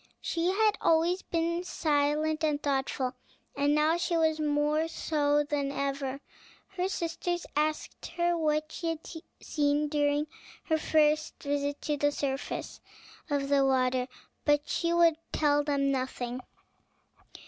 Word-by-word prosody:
She 335 +1 -1
had 420 +3 +2
always 335 +3 +3
been 335 +1 -1
silent 310 -1 0
and 300 -2 +1
thoughtful, 270 -2 -1 0.4
and 285 +1 +2
now 310 +2 +3
she 345 -1 0
was 315 -1 +2
more 300 +1 +1
so 295 -2 +1
than 285 -2 -1
ever. 275 -1 -3 0.5
Her 375 -1 -2
sisters 345 0 -2
asked 305 +1 -1
her 345 0 +2
what 310 -1 0
she 335 - -4
had 325 -1 -3 0.3
seen 295 0 +1
during 290 0 +1 0.4
her 315 -1 +1
first 310 0 +2
visit 285 0 -2
to 295 -1 -1
the 290 +1 +2
surface 275 -1 -4 0.5
of 285 -1 0
the 280 -1 +4
water; 255 -1 +2 0.4
but 290 0 +2
she 335 -1 0
would 340 -2 +4 0.2
tell 290 -1 +3
them 280 -1 +1
nothing. 255 -2 -3
300 Hz, 135 wpm, -29 LUFS, 285-325 Hz, 0.5 s, the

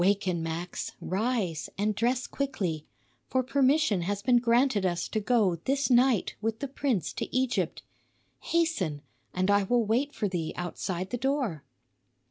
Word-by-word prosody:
"Waken, 190 -3 +1
Max, 165 +2 -4
rise 190 - -1
and 210 +2 +1
dress 245 +4 0
quickly; 185 - -3 0.4
for 260 0 +1
permission 270 - +3
has 200 +3 -2
been 250 -2 +5
granted 240 -2 +3
us 175 -1 0
to 215 - -1
go 210 -5 +2
this 275 0 +1
night 245 -3 +4
with 225 0 -1
the 280 - -4
prince 260 - -1
to - - -4
Egypt. 255 -1 0 0.6
Hasten, 205 - 0 0.3
and 185 +2 +1
I 205 0 +5
will 235 +4 +2
wait 250 +7 +1
for 210 - 0
thee 175 -4 -3
outside 175 +1 -4
the 245 - -1
door." 260 - -1
215 Hz, 150 wpm, -28 LUFS, 180-255 Hz, 0.6 s, been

